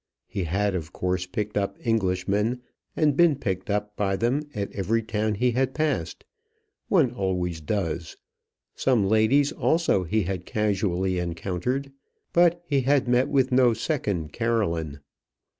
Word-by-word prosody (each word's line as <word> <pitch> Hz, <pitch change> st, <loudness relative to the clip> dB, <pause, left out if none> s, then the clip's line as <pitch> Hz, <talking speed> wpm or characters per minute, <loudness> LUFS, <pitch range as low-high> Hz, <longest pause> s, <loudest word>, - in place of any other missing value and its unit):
He 95 Hz, -3 st, -4 dB
had 100 Hz, +5 st, 0 dB
of 80 Hz, -4 st, -4 dB
course 90 Hz, 0 st, -2 dB
picked 105 Hz, +3 st, -4 dB
up 100 Hz, -1 st, -1 dB
Englishmen, 105 Hz, +2 st, 0 dB, 0.3 s
and 150 Hz, -3 st, +2 dB
been 170 Hz, -1 st, +5 dB
picked 95 Hz, -8 st, -3 dB
up 105 Hz, 0 st, -2 dB
by 95 Hz, -1 st, 0 dB
them 120 Hz, +8 st, +1 dB
at 100 Hz, -1 st, -3 dB
every 110 Hz, +4 st, 0 dB
town 110 Hz, -1 st, -1 dB
he 125 Hz, +4 st, +2 dB
had 130 Hz, +2 st, 0 dB
passed; 155 Hz, 0 st, -2 dB, 0.6 s
one 155 Hz, -, +3 dB
always 90 Hz, -6 st, -2 dB
does; 85 Hz, -1 st, -3 dB, 0.6 s
some 125 Hz, -7 st, +2 dB
ladies 110 Hz, +7 st, +3 dB
also 165 Hz, -, +1 dB
he 105 Hz, +5 st, 0 dB
had 95 Hz, -1 st, -3 dB
casually 95 Hz, -3 st, 0 dB
encountered 90 Hz, +11 st, -3 dB, 0.4 s
but 175 Hz, 0 st, +4 dB
he 140 Hz, -4 st, +1 dB
had 135 Hz, 0 st, +2 dB
met 125 Hz, +1 st, +3 dB
with 135 Hz, -2 st, +2 dB
no 125 Hz, -2 st, +4 dB
second 105 Hz, -, -2 dB
Caroline. 85 Hz, -11 st, -1 dB
105 Hz, 140 wpm, -25 LUFS, 95-125 Hz, 0.6 s, been